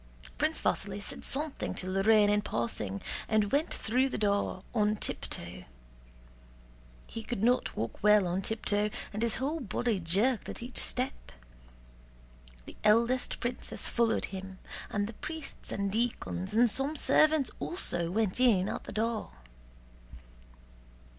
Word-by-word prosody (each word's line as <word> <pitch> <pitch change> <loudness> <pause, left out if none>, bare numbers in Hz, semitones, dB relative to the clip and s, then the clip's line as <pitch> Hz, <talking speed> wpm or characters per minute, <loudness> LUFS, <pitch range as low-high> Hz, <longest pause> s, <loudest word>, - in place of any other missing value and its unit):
Prince - - +1
Vasíli 200 0 -1
said 205 - -5
something 295 +1 +1
to 185 - -3
Lorrain 205 +3 +4
in 205 0 +3
passing 110 - -3 0.2
and 215 -2 +2
went 295 +4 +1
through 255 +4 +1
the - - -3
door 200 -2 0
on 210 -2 +2
tiptoe. - - -5 1.4
He 225 - -7
could 220 -2 -4
not 245 +2 +2
walk 115 0 -4
well 210 -1 +5
on 180 +2 -1
tiptoe 210 0 0 0.2
and 210 - -3
his 235 -1 +3
whole 295 +5 -1
body 230 -3 -1
jerked 200 +9 +1
at - - -6
each 250 +1 -4
step. 255 +2 -2 1.3
The - - -11
eldest 235 +4 +3
princess 240 +1 -3
followed 230 -1 +1
him, 190 0 -7 0.3
and 205 -1 -1
the 225 - -7
priests 315 +6 -7
and 200 0 -1
deacons 215 -4 -2
and 240 +2 +6
some 270 +7 +1
servants 305 0 +4
also 175 - +1
went 210 +2 0
in 210 -7 +4
at - - -5
the - - -7
door. 225 0 -1
215 Hz, 140 wpm, -30 LUFS, 200-250 Hz, 1.4 s, and